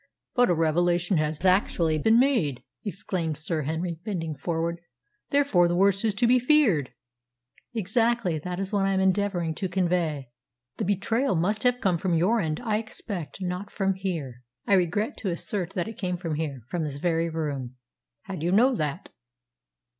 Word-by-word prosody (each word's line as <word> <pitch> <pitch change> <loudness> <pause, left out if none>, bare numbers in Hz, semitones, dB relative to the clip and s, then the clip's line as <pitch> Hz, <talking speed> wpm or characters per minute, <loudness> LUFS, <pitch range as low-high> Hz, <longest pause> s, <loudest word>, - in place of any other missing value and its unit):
"But 245 -1 +4
a 175 - +3
revelation 175 +3 +2
has 155 +2 -1
actually 175 -4 +2
been 225 +8 +4
made!" 230 - +1 0.2
exclaimed 180 -6 -3
Sir 155 +1 -1
Henry, 160 +3 -3
bending 170 -7 -3
forward. 170 +3 -2 0.5
"Therefore 280 - +3
the 175 - 0
worst 195 +2 +3
is 215 -3 +1
to 220 - +2
be 250 +2 +5
feared." 245 - +3 0.8
"Exactly. 220 -4 +1
That 180 +3 -5
is 195 0 -3
what 200 -2 +1
I 195 - +1
am - - +2
endeavouring 190 -3 +1
to 185 +4 -3
convey." 170 -8 0 0.5
"The - - -1
betrayal 215 +5 +1
must 200 +6 0
have 250 0 +2
come 180 -4 +1
from 180 -1 0
your 195 +8 +3
end, 155 -5 -1
I 215 -3 +1
expect; 195 -5 -6
not 180 +2 -3
from 195 -1 0
here." 165 -10 -4 0.2
"I - - +2
regret 195 +4 +1
to 200 - -3
assert 180 +1 -3
that 175 -3 -2
it 225 - -8
came 180 -2 -1
from 170 -3 -4
here 150 -4 -3
from 170 +3 -2
this 145 -2 -4
very 165 +1 0
room." 140 -6 -4 0.5
"How 195 - -7
do 155 - -6
you 175 - +1
know 245 +7 +5
that?" 155 - -3
180 Hz, 175 wpm, -26 LUFS, 160-205 Hz, 0.8 s, be